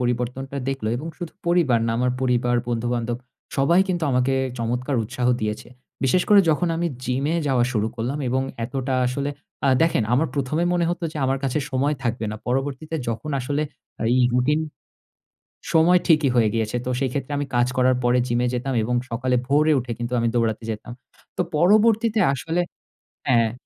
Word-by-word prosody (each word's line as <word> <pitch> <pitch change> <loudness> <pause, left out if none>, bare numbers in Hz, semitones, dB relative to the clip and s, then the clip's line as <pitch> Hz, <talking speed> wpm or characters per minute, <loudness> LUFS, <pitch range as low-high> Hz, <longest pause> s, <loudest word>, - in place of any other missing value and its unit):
পরিবর্তনটা 125 +3 -2
দেখলো 135 -5 -2
এবং 150 +6 -6
শুধু 175 -3 -6
পরিবার 170 -9 +3
না - - 0
আমার 125 0 +2
পরিবার, 125 -1 +1
বন্ধু-বান্ধব 120 0 -1 0.4
সবাই 170 +7 +4
কিন্তু 175 -3 0
আমাকে 125 +1 +2 0.3
চমৎকার 125 +4 -1
উৎসাহ 125 +3 -3
দিয়েছে। 105 0 -3 0.4
বিশেষ 175 +7 +3
করে 205 -1 +8
যখন 170 +3 +1
আমি 170 +1 0 0.2
জিমে 135 +6 0
যাওয়া 130 -3 +3
শুরু 110 -1 +1
করলাম 125 +6 -2
এবং 130 +2 +1 0.2
এতটা 130 +1 -2
আসলে 140 +3 -2 0.4
আ - - +4
দেখেন 165 -8 +2
আমার 150 +6 +2
১ম 140 +2 -1
এ - - +3
মনে 170 -1 +2
হতো 175 0 -3
যে - - -8
আমার 135 +1 +1
কাছে 135 +3 0
সময় 140 +3 +1
থাকবে 120 -2 -1
না। 110 - -5
পরবর্তীতে 135 +5 -2
যখন 115 +7 -3
আসলে 145 +4 -1 0.5
এই 130 - +3
রুটিন 145 +5 +2 1.1
সময় 175 +3 +5
ঠিকই 155 -4 +4
হয়ে 110 -3 +4
গিয়েছে। 110 0 -1
তো - - -2
সেইক্ষেত্রে 135 +1 -2
আমি 145 - -1
কাজ 120 0 +3
করার 130 0 +4
পরে 120 +1 +3
জিমে 120 +1 +1
যেতাম 130 +2 -2
এবং 125 +2 -1
সকালে 125 +2 0
ভোরে 150 +2 +3
উঠে 120 -1 -6
কিন্তু 120 +1 -3
আমি 115 - +1
দৌড়াতে 115 -1 0
যেতাম। 110 +2 -7 0.5
তো - - +2 0.2
পরবর্তীতে 215 +4 +4
আসলে 165 +6 -1 0.7
হ্যাঁ, 130 -3 +4
হ্যাঁ। 115 -1 0
130 Hz, 175 wpm, -23 LUFS, 120-150 Hz, 1.1 s, করে